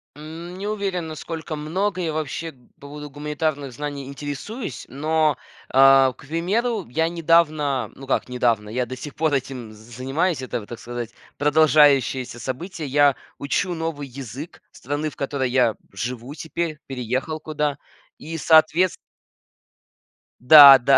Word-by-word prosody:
М, 165 +4 -9
не 200 +2 -5
уверен, 195 -5 -2
насколько 160 +1 -6
много 185 +6 -2
я 165 -3 -1
вообще 155 +1 -3
по 125 -4 -28
поводу 150 0 -8
гуманитарных 145 -1 -3
знаний 140 +1 -6
интересуюсь, 145 - -6
но, 155 +3 +1 0.3
а, 135 0 +6
к - - -16
примеру, 195 - -1
я 160 +6 +1
недавно, 155 -7 +2
ну, 135 - -11
как 135 - 0
недавно, 120 -4 0
я 125 +3 -1
до 130 - -6
сих 145 +2 -8
пор 155 -1 +1
этим 125 -4 -3
занимаюсь, 130 +9 -2
это, 130 -2 -3
вот, 105 - -12
так 120 - -7
сказать, 120 -1 -6 0.2
продолжающееся 145 -4 +3
событие, 155 +5 -5
я 145 0 +4 0.2
учу 175 +6 -1
новый 160 -3 -4
язык 135 +4 -9
страны, 145 +4 -3
в - - -16
которой 135 -2 -2
я 125 -3 +3 0.2
живу 120 +6 -5
теперь, 160 0 -4
переехал 130 +4 -3
куда 150 -2 -2 0.4
и 165 +2 -7
соответс 160 +3 +4 1.5
Да-да, 135 -1 +9
145 Hz, 135 wpm, -23 LUFS, 130-160 Hz, 1.5 s, Да-да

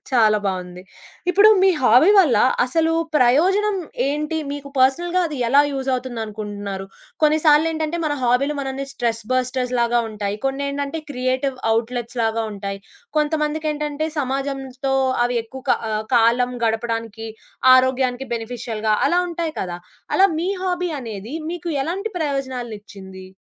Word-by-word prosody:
చాలా 220 -4 +4
బావుంది. 180 -1 -4 0.5
ఇప్పుడు 405 +3 +6
మీ 385 - +6
హాబీ 255 - +6
వల్ల 320 - +5 0.3
అసలు 325 +5 +1 0.2
ప్రయోజనం 370 +11 +3 0.3
ఏంటి? 300 +3 -1
మీకు 285 0 -6
పర్సనల్‌గా 345 +8 +2
అది 305 -3 -6
ఎలా 275 +4 +6
యూజ్ 270 -1 -4
అవుతుంది 250 -2 -3
అనుకుంటున్నారు? 205 -2 -6 0.4
కొన్ని 305 0 +4
సార్లేటంటే 315 +1 +3
మన 300 - 0
హాబీలు 255 +4 +2
మనల్ని 270 0 -4
స్ట్రెస్ 230 -3 -2
బస్టర్స్‌లాగా 250 -2 +1
ఉంటాయి. 205 -2 -3
కొన్నేంటంటే 280 +3 -2
క్రియేటివ్ 255 +1 -1 0.2
ఔట్లెట్స్‌లాగా 230 -1 -2
ఉంటాయి. 200 -1 -5 0.4
కొంతమందికేంటంటే 300 0 -1
సమాజంతో 270 -1 -2 0.3
అవి 245 0 -1
ఎక్కువ 260 +3 -10 0.5
కాలం 240 +2 +3
గడపడానికి, 225 -1 -2 0.5
ఆరోగ్యానికి 260 0 +2
బెనిఫిషియల్‌గా 225 -2 -2
అలా 350 +1 +3
ఉంటాయి 330 -2 -3
కదా! 175 -2 -4 0.4
అలా 385 - +6
మీ 345 +3 -1
హాబీ 360 -1 -1
అనేది 225 +1 -7 0.2
మీకు 345 0 -5
ఎలాంటి 370 +9 -3
ప్రయోజనాలు 260 -5 -3
ఇచ్చింది? 190 -2 -12
260 Hz, 120 wpm, -21 LUFS, 230-300 Hz, 0.5 s, ఇప్పుడు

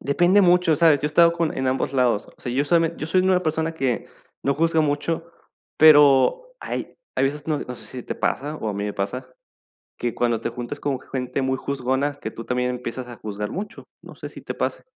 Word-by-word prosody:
depende 175 +8 +3
mucho, 175 -3 +4
¿sabes?, 160 -4 +5
yo 150 - 0
he - - 0
estado 170 +2 +5
con 170 -2 -1
en 130 0 -1
ambos 130 +1 0
lados. 125 -5 +1
O - - -26
sea, 120 - -4
yo 140 +3 +1
soy 170 +2 +3
me 165 0 0
yo 155 - -5
soy 185 +2 +2
una 185 -1 +3
persona 160 +1 -1
que 130 -7 -1 0.4
no 140 0 +1
juzga 165 +1 +2
mucho, 150 +3 -1 0.5
pero 155 - +6
hay - - -5 0.2
hay - - +2
veces 145 +2 -2
no 155 -2 0
no 125 - -6
sé - - -13
si 125 -2 -8
te - - -5
pasa, 150 +3 -2
o 110 - -4
a 100 - -3
mí 100 0 -3
me 105 - -3
pasa, 125 +6 -4 0.7
que 120 -2 -3
cuando 120 -2 0
te 115 - -3
juntas 120 +4 -6
con 135 -3 -2
gente 125 0 -4
muy 130 0 0
juzgona 140 +2 -2
que 110 - -4
tú 115 - -9
también 125 +1 -1
empiezas 125 0 -5
a 120 - -9
juzgar 105 0 -5
mucho, 205 - -6 0.2
no - - -12
sé, - - -8
si - - -12
te - - -5
pase. - - -2
140 Hz, 235 wpm, -23 LUFS, 125-160 Hz, 0.7 s, pero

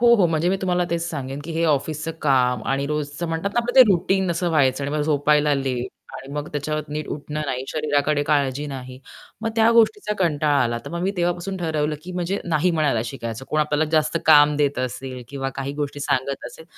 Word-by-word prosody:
हो, 235 0 +6
हो. 200 -6 +4
म्हणजे 165 +1 0
मी 190 - +2
तुम्हाला 180 -1 +1
तेच 170 0 0
सांगेन 140 -3 -5
की 165 - -5
हे 165 +1 0
ऑफिसच 155 +2 -1
काम 125 -5 +2
आणि 135 +1 0
रोजचं 150 +2 -3
म्हणतात 165 +5 -2
ना, 240 - +3
आपलं 245 +1 -4
ते 260 - +12
रुटीन 190 +1 +2
असं 170 +1 0
व्हायचं 140 -3 +2
आणि 140 - -3
मग - - 0
झोपायला 150 0 +2
लेट 130 -3 -2 0.3
आणि 135 +1 -10
मग 150 +1 -4
त्याच्यावर 155 +1 -2
नीट 150 0 -4
उठणं 150 +1 -4
नाही, 130 -1 -2
शरीराकडे 145 -1 +1
काळजी 145 -1 0
नाही, 130 -2 -7 0.4
मग 225 - 0
त्या 225 0 +5
गोष्टीचा 235 - +3
कंटाळा 150 -5 +2
आला. 120 -1 -1
तर - - -7
मग 170 +1 -4
मी 190 - +1
तेव्हापासून 175 +2 -1
ठरवलं 155 -3 -1
की 180 - -8
म्हणजे 180 +2 -2
नाही 170 +1 +1
म्हणायला 150 -8 +1
शिकायचं. 115 -1 -6
कोण 155 - +1
आपल्याला 150 +1 +1
जास्त 155 0 +2
काम 150 -1 +7
देत 145 -2 +1
असेल 130 0 -4
किंवा 135 -1 -3
काही 135 +1 -4
गोष्टी 145 -1 -4
सांगत 140 -1 -1
असेल. 160 - -11
150 Hz, 210 wpm, -22 LUFS, 140-170 Hz, 0.4 s, ते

